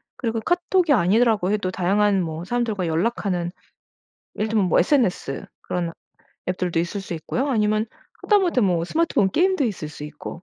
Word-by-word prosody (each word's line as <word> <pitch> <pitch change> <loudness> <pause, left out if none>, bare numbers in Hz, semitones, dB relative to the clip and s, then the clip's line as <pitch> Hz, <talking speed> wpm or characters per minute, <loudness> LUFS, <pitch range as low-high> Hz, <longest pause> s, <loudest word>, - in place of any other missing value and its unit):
그리고 230 -2 -2
카톡이 350 - +2
아니더라고 210 0 +3
해도 200 -3 0
다양한 195 +2 +2
뭐 165 0 -4
사람들과 220 -6 -1
연락하는 175 0 -1 0.9
예를 215 +1 -1
들면 210 -4 +2
뭐 - - +3
SNS 185 - +1 0.2
그런 175 -2 -2 0.6
앱들도 180 -2 -1
있을 190 +4 -3
수 185 - -7
있고요. 245 - -2
아니면 215 -2 +2 0.4
하다못해 370 - +3
뭐 175 -4 +2
스마트폰 260 - +1
게임도 365 - +2
있을 185 -9 -3
수 150 -1 -9
있고 150 +3 -8
205 Hz, 370 characters per minute, -23 LUFS, 175-240 Hz, 0.9 s, 아니더라고